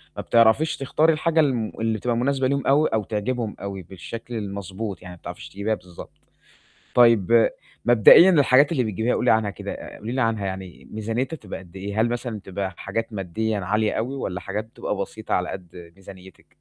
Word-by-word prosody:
ما -, -, -4 dB
بتعرفيش 115 Hz, +7 st, +3 dB
تختاري 155 Hz, +4 st, +2 dB
الحاجة 160 Hz, +1 st, +1 dB
الـم 125 Hz, -7 st, +1 dB
اللي 110 Hz, -1 st, 0 dB
بتبقى 120 Hz, +2 st, -1 dB
مناسبة 130 Hz, +1 st, +1 dB
ليهم 140 Hz, 0 st, -1 dB
أوي، 145 Hz, +3 st, +4 dB
أو 110 Hz, -2 st, +1 dB
تعجبهُم 110 Hz, +2 st, -3 dB
أوي 100 Hz, -1 st, -5 dB
بالشكل 115 Hz, +7 st, -8 dB
المضبوط، 100 Hz, -1 st, -5 dB
يعني 90 Hz, 0 st, -9 dB
ما -, -, -18 dB
بتعرفيش 90 Hz, 0 st, -9 dB
تجيبيها 100 Hz, +3 st, -2 dB
بالضبط. 90 Hz, -3 st, -12 dB, 0.8 s
طيب 115 Hz, -2 st, +5 dB, 0.4 s
مبدئيًا 120 Hz, -, +8 dB
الحاجات 145 Hz, -3 st, +5 dB
اللي 130 Hz, -6 st, +1 dB
بتجيبيها 110 Hz, +2 st, -1 dB
قولي 125 Hz, -, +3 dB
عنها 110 Hz, -2 st, +2 dB
كده، 100 Hz, -, -6 dB
آآ -, -, -9 dB
قولي 110 Hz, +3 st, -6 dB
لي 130 Hz, +1 st, -1 dB
عنها 110 Hz, -3 st, 0 dB
يعني 95 Hz, -2 st, -7 dB
ميزانيتها 115 Hz, +8 st, -3 dB
بتبقى 100 Hz, -6 st, -8 dB
قد 90 Hz, 0 st, -16 dB
إيه، 100 Hz, +3 st, -2 dB
هل 120 Hz, -, +2 dB
مثلًا 120 Hz, -2 st, -3 dB
بتبقى 95 Hz, -1 st, -5 dB
حاجات 115 Hz, +3 st, -4 dB
ماديًا 105 Hz, +3 st, -2 dB
عالية 105 Hz, +3 st, 0 dB
أوي 125 Hz, +5 st, -2 dB
والّا 95 Hz, -8 st, -4 dB
حاجات 105 Hz, +3 st, -4 dB
بتبقى 115 Hz, -, -4 dB
بسيطة، -, -, -4 dB
على -, -, 0 dB
قدّ 90 Hz, -2 st, -9 dB
ميزانيتِك؟ 95 Hz, -1 st, -14 dB
110 Hz, 185 wpm, -23 LUFS, 95-125 Hz, 0.8 s, مبدئيًا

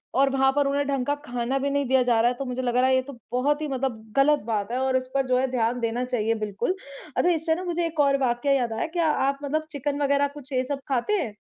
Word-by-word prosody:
और 275 Hz, +1 st, +4 dB
वहाँ 270 Hz, 0 st, +3 dB
पर 285 Hz, -1 st, +2 dB
उन्हें 285 Hz, 0 st, 0 dB
ढंग 270 Hz, -3 st, -1 dB
का 290 Hz, -, +1 dB
खाना 245 Hz, +1 st, -2 dB
भी 280 Hz, +1 st, -1 dB
नहीं 285 Hz, 0 st, 0 dB
दिया 260 Hz, +1 st, +3 dB
जा 235 Hz, -2 st, +2 dB
रहा 240 Hz, +1 st, +4 dB
है 245 Hz, -, -6 dB
तो 275 Hz, -, -4 dB
मुझे 250 Hz, +1 st, -3 dB
लग 245 Hz, -1 st, -1 dB
रहा 255 Hz, +1 st, +4 dB
है 260 Hz, -, +4 dB
ये 260 Hz, -, +3 dB
तो 275 Hz, -2 st, -10 dB
बहुत 290 Hz, +5 st, +1 dB
ही 305 Hz, -, -2 dB
मतलब 255 Hz, -5 st, -3 dB
ग़लत 295 Hz, +2 st, +5 dB
बात 215 Hz, -1 st, -2 dB
है 250 Hz, -, -1 dB
और 265 Hz, 0 st, +1 dB
इस 255 Hz, 0 st, -4 dB
पर 270 Hz, -1 st, +1 dB
जो 255 Hz, 0 st, +3 dB
है 265 Hz, +1 st, +1 dB
ध्यान 245 Hz, 0 st, 0 dB
देना 235 Hz, +2 st, -1 dB
चाहिए 225 Hz, -2 st, 0 dB
बिल्कुल, 215 Hz, -, -2 dB, 0.4 s
अच्छा 355 Hz, -, +3 dB
इससे 320 Hz, -1 st, +1 dB
ना 365 Hz, -, -5 dB
मुझे 345 Hz, -1 st, -1 dB
एक 320 Hz, -2 st, -5 dB
और 280 Hz, -1 st, +4 dB
वाक़या 255 Hz, +1 st, 0 dB
याद 240 Hz, -4 st, 0 dB
आया, 270 Hz, +9 st, -2 dB
क्या 335 Hz, -1 st, 0 dB
आप 275 Hz, 0 st, 0 dB
मतलब 310 Hz, +2 st, -1 dB
चिकन 285 Hz, +1 st, -2 dB
वगैरह 280 Hz, 0 st, +3 dB
कुछ 285 Hz, -1 st, -11 dB
ये 255 Hz, -, +2 dB
सब 280 Hz, +1 st, -3 dB
खाते 265 Hz, -, 0 dB
हैं? 215 Hz, -4 st, -7 dB
265 Hz, 280 wpm, -25 LUFS, 245-285 Hz, 0.4 s, ग़लत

